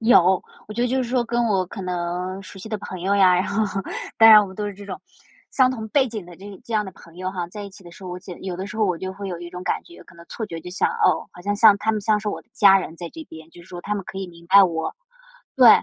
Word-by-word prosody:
有， 190 -6 +5 0.2
我 215 - -8
觉 240 - 0
得 245 - +1
就 260 +1 +1
是 240 - -5
说 250 -1 +1
跟 240 +1 0
我 195 -5 +1
可 195 +2 -8
能， 180 +1 -3
熟 195 - -12
悉 195 - -9
的 215 - -2
朋 185 -2 -7
友 195 +3 +1
呀， 190 -2 +6
然 180 +2 +1
后， 205 -1 -1 0.4
当 225 - +8
然 215 -1 +11
我 205 - -1
们 190 - -11
都 210 - -2
是 205 - -5
这 200 +1 -11
种， 190 - -6 0.5
相 255 -2 +4
同 225 -4 -5
背 265 +3 +2
景 215 -4 -6
的 175 - -12
这 195 +1 -11
这 230 - -8
样 210 -1 +2
的 190 - -7
朋 165 -1 -17
友 185 +1 -3
哈， 180 -2 -4
在 205 +4 -8
一 200 - -8
起 195 0 -16
的 175 - -11
时 170 - -15
候， 185 - -6
我 180 - -5
简 180 -1 -9
我 - - -16
觉 - - -17
得 - - -7
有 180 - -4
的 190 +2 -5
时 210 +1 -8
候 220 - +2
我 180 -4 0
就 190 +1 -5
会 200 +1 -7
有 175 -2 -5
一 175 0 -8
种 180 0 -7
感 - - -1
觉， 345 - -14
可 - - -18
能 170 0 -14
错 225 - -5
觉 165 -4 -7
就 180 - -9
像， 185 - +1
哦， 455 -2 +1
好 - - -13
像 205 +2 -1
像 210 0 +7
他 220 - 0
们 215 - -1
像 210 +1 +2
是 210 0 -4
我 - - -4
的 - - -42
家 195 -2 +6
人 170 -3 -6
在 170 0 -6
这 325 - -9
边， 160 - -12
就 175 - -14
是 175 - -18
说 175 -1 -7
他 205 +4 -3
们 200 - -3
可 190 - -7
以 195 - -4
明 170 -1 -15
白 195 +3 +8
我。 165 -4 -1 0.6
对， 255 -3 +8
195 Hz, 355 characters per minute, -23 LUFS, 180-215 Hz, 0.6 s, 然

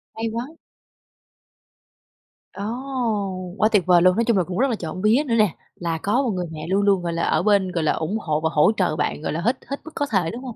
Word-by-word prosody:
Hay 225 0 -2
quá! 230 +3 -4 2.1
Ồ, 200 - -6 0.9
quá 215 - +3
tuyệt 205 -5 +3
vời 180 -1 +5
luôn! 185 +1 +5
Nói 230 +2 +1
chung 230 -3 +2
là 185 - +3
cũng 180 +1 -5
rất 270 - +3
là 235 - 0
trộm 180 -1 -6
vía 220 +8 +3
nữa 230 - +1
nè, 210 -5 +3 0.2
là 170 -2 -3
có 205 +10 +1
một 265 - -1
người 180 -2 -2
mẹ 155 0 -7
luôn 195 +2 +2
luôn, 195 -2 +3
gọi 170 -1 -2
là, 170 - -1
ở - - +1
bên, 200 -3 +3
gọi 170 -2 -1
là, 155 - +3
ủng 165 +7 -2
hộ 155 -6 -1
và 160 - +1
hỗ 150 +5 +4
trợ 180 -5 +1
bạn, 150 - -2
gọi - - -3
là, 165 - -2
hết 240 +8 +1
hết 280 - -4
mức 320 - -9
có 285 - 0
thể, 185 -6 +1
đúng 245 +3 -8
không? 250 -4 -7
195 Hz, 255 wpm, -22 LUFS, 170-225 Hz, 2.1 s, vời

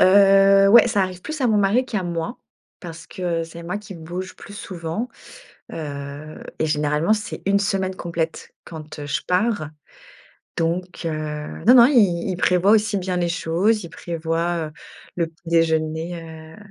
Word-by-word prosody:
Heu, 195 0 +6
ouais, 235 +3 +7
ça 205 -4 +2
arrive 185 -1 -4
plus 310 -1 -6
à 255 - +3
mon 220 -3 +3
mari 205 +6 +3
qu'à 215 -6 -3
moi, 170 +5 -4 0.4
parce 165 -2 -9
que 170 -2 -2
c'est 165 +1 -10
moi 180 +5 -4
qui 210 -2 -10
bouge 175 +3 -6
plus 205 - -12
souvent. 180 +3 -5 0.6
Heu 145 0 -7 0.2
et 160 - +1
généralement 150 +5 +1
c'est 215 0 -6
1 200 0 +4
semaine 190 -1 -1
complète 165 -2 -4
quand, 155 -2 -9
heu, 145 - -6
je 140 - -2
pars. 180 -4 0 0.9
Donc, 175 +2 -2
heu, 155 -2 -4
non 245 - +8
non 240 -1 +9
il 200 -10 +3
il 180 - -2
prévoit 180 +1 +3
aussi 215 -1 +3
bien 185 -1 -2
les 175 -1 0
choses, 180 +5 +1
il 170 - -8
prévoit, 165 0 -2
heu, 150 - -14 0.4
le 170 -2 +1
petit 165 +1 -15
déjeuner, 160 0 +1
heu 160 0 -11
175 Hz, 170 wpm, -22 LUFS, 160-195 Hz, 0.9 s, non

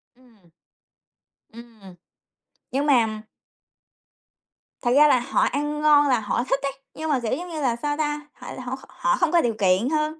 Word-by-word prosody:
Ừm. 230 -9 -25 1.0
Ừm, 225 -5 -14 0.8
nhưng 280 +3 -1
mà 225 -6 +2 1.6
Thật 240 - 0
ra 300 +1 +7
là 255 - +4
họ 255 +3 -1
ăn 295 +2 -1
ngon 295 -1 +5
là 255 -3 +2
họ 220 +3 -1
thích 270 +1 0
ấy, 275 - -1 0.2
nhưng 315 0 -5
mà, 275 - +2
kiểu, 235 -1 -2
giống 355 +5 -7
như 315 -2 -5
là, 245 -4 +1
sao 290 +4 -3
ta, 295 -1 -3
họ - - -10
là - - -8
họ 250 +1 -4
h 265 - -15
họ - - 0
không 345 -3 +1
có 345 - +4
điều 235 -5 0
kiện 195 +5 +2
hơn, 310 0 -1
270 Hz, 190 wpm, -23 LUFS, 235-300 Hz, 1.6 s, ra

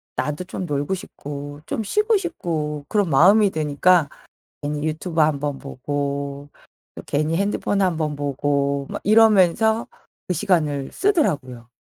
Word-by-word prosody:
나도 150 +7 -3
좀 185 0 -5
놀고 145 +2 -2
싶고 145 -4 -8
좀 220 - -3
쉬고 425 - +2
싶고 155 - -3
그런 205 -4 +1
마음이 195 +9 +5
드니까 155 +1 +2 0.5
괜히 145 0 -3
유튜브 160 +1 -1
한번 145 -2 0
보고 140 +1 -4 0.5
또 - - -7
괜히 155 +3 0
핸드폰 200 0 0
한번 160 -5 0
보고 140 0 -1
막 - - -5
이러면서 220 0 +4 0.4
그 180 - 0
시간을 155 -7 0
쓰더라구요. 140 - 0
155 Hz, 270 characters per minute, -22 LUFS, 145-190 Hz, 0.5 s, 마음이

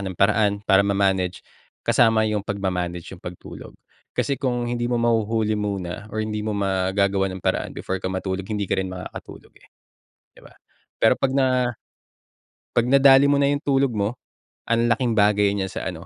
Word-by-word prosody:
ng 95 -2 -5
paraan 105 +2 +3
para 95 -2 +5
ma-manage. 95 -2 0 0.4
Kasama 110 -2 +3
'yung 105 -1 0
pagma 100 -2 -3
manage 90 0 -4
'yung 90 - -11
pagtulog 90 -1 -10 0.4
kasi 140 - 0
kung 125 -3 -1
hindi 120 0 -2
mo 120 - 0
mahuhuli 115 -2 +1
muna 100 0 -4
or 110 +1 -3
hindi 105 0 -3
mo 105 -1 -3
magagawan 95 0 +1
ng 95 - -12
paraan - - -1
before 95 0 -4
ka 95 - -3
matulog 95 0 -4
hindi 105 -1 -2
ka 95 - -1
rin 95 - -3
makakatulog 95 0 -9
eh, - - -22 0.7
'di - - -19
ba? - - -18 0.4
Pero - - +4
'pag 135 - -1
na 130 -2 +2 1.1
'pag 120 0 +3
nadali 135 +1 +6
mo 145 - +4
na 140 - +3
'yung 145 +1 -1
tulog 135 -2 +2
mo 105 +2 -2 0.5
an'laking 115 +1 +2
bagay 105 -1 +4
niya 95 - -1
sa - - -5
ano, 85 -1 -9
105 Hz, 175 wpm, -23 LUFS, 95-120 Hz, 1.1 s, nadali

